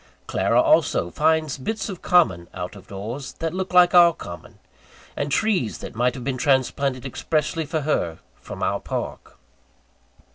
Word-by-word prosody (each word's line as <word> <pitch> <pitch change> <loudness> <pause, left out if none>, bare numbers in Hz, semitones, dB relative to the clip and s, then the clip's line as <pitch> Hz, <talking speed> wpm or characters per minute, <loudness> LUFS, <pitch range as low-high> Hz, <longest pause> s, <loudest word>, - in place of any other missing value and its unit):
Clara, - - +1
also, 85 - +3
finds 155 - +1
bits 220 +12 -3
of 190 -4 -7
common, 125 - +3
out 90 +2 -5
of 100 - -14
doors, 110 +8 -6
that 165 0 -4
look 190 0 -3
like 180 -1 +6
our 175 -1 +7
common; 85 -2 -10 0.6
and 145 0 -3
trees 175 - +1
that - - -8
might 125 +2 +1
have 125 - -7
been 135 -1 -2
transplanted 135 -1 +1
expressly 155 +4 -2
for 155 +1 -1
her, 85 - -1 0.2
from - - -8
our - - 0
park. - - -6
140 Hz, 155 wpm, -23 LUFS, 115-165 Hz, 0.6 s, our